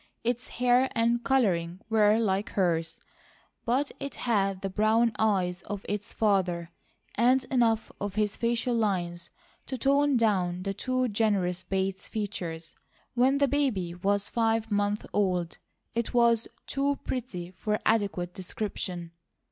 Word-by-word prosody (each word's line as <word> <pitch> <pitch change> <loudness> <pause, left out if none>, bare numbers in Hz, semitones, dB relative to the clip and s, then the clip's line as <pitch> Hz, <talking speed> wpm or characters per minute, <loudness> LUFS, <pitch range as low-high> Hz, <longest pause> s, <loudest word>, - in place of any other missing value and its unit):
Its 240 +1 -1
hair 250 +2 +2
and 235 +1 +2
colouring 185 -10 +1
were 215 -1 +4
like 205 -2 0
hers, 165 -3 0 0.7
but 265 +4 +1
it 280 0 -5
had 195 -5 0
the 195 - -1
brown 220 +3 +3
eyes 190 -4 +1
of 205 -1 -5
its 205 0 -3
father, 180 -5 +1 0.4
and 250 +3 +3
enough 230 -4 +2
of 200 -1 -3
his 210 -1 0
facial 235 +1 0
lines 180 -6 -1 0.4
to 260 - -3
tone 280 +2 +3
down 185 -6 +1
the 195 0 -2
too 255 +4 0
generous 200 -5 +1
Bates 190 0 -2
features. 175 -7 -5 0.4
When 255 +3 +3
the 280 0 +3
baby 245 -12 0
was 200 +3 0
five 225 -1 0
months 205 0 0
old 180 -4 0 0.3
it 235 +1 -2
was 235 -1 +4 0.2
too 280 +1 0
pretty 190 -9 -4
for 210 +3 -1
adequate 200 -5 +1
description. 185 -3 -4
210 Hz, 135 wpm, -28 LUFS, 185-235 Hz, 0.7 s, were